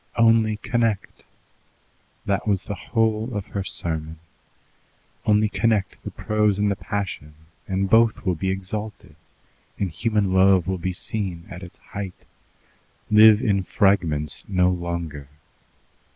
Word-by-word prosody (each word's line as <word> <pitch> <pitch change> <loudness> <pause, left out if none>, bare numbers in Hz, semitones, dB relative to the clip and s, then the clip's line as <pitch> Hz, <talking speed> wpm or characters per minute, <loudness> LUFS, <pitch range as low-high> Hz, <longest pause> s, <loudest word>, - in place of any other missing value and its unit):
Only 115 -2 +4
connect! 115 -2 -2 1.0
That 100 +2 -1
was 100 -2 +1
the 105 - -5
whole 110 +4 -1
of 100 - -4
her 100 - -2
sermon. 80 -3 -3 1.1
Only 105 0 +4
connect 110 -2 0
the - - -5
prose 105 -2 0
and 105 0 +1
the - - 0
passion, 95 -8 -5 0.3
and 95 0 0
both 115 +2 +3
will 90 - +2
be 95 +3 -2
exalted, 95 +3 -5 0.6
and 95 -4 -2
human 105 0 0
love 95 -2 +5
will 95 -1 -2
be 95 +2 -2
seen 90 -2 -3
at 90 0 -8
its 90 -2 -11
height. 100 -2 -7 1.0
Live 110 0 +7
in 100 -2 +2
fragments 85 -7 +1
no 90 -2 +2
longer. 85 -5 -5
100 Hz, 130 wpm, -23 LUFS, 90-105 Hz, 1.1 s, Live